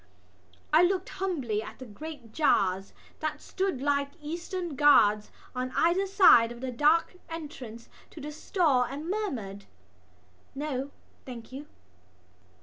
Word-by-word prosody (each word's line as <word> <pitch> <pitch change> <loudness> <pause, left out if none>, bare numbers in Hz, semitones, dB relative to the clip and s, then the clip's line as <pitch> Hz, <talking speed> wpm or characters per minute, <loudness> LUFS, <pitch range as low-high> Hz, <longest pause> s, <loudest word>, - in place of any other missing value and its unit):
I 315 - +7
looked 370 +1 +1
humbly 275 - -2
at - - -9
the 260 - -9
great 260 +1 -9
jars 195 -10 +2 0.3
that 310 -1 -3
stood 370 -9 -2
like 280 -1 +1
eastern 340 +2 -5
guards 215 -8 +5 0.3
at 255 0 -2
either 360 +4 +3
side 370 - +6
of 240 - -9
the 260 0 -4
dark 305 +7 +2
entrance 270 -8 -8 0.2
to - - -12
the 300 +1 -6
stall 305 -4 +2
and 280 +5 -3
murmured: 230 - -4 0.9
"No, 275 -1 -3 0.3
thank 240 -3 -9
you." 280 +3 -8
290 Hz, 130 wpm, -28 LUFS, 240-335 Hz, 0.9 s, I